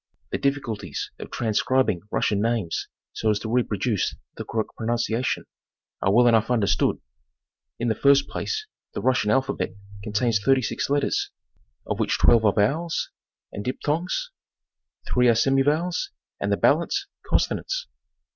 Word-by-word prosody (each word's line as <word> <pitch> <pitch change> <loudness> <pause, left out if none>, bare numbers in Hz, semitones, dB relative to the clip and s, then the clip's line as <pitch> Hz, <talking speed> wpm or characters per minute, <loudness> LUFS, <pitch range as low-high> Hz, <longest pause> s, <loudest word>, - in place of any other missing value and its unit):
The - - -1
difficulties 115 - -2
of - - -7
transcribing 115 -3 +1
Russian 105 -1 +1
names 110 -7 -1 0.3
so 110 - 0
as 105 - +3
to 110 - -4
reproduce 110 -3 0 0.2
the - - -5
correct 110 -2 -3
pro 110 - -5
nunciation 120 +1 0 0.6
are 95 - +2
well 120 +4 +5
enough 115 -2 +4
understood. 105 -5 +2 0.8
In 120 - -2
the 110 - +3
first 140 +3 +4
place 435 -1 -3 0.3
the - - -2
Russian 125 -5 +2
alphabet 135 -5 0 0.3
contains 110 +1 +1
36 135 -1 +1
letters, 145 0 +1 0.6
of - - -3
which - - +1
12 115 -2 +5
are 105 - +6
vowels 155 +11 0 0.4
and 100 - -6
diphthongs, 165 - -2 0.8
3 125 0 +4
are 115 - +5
semi 135 +4 +3
vowels, 170 - 0 0.3
and - - -1
the - - +2
balance, - - +2 0.2
consonants. - - 0
120 Hz, 140 wpm, -25 LUFS, 110-140 Hz, 0.8 s, are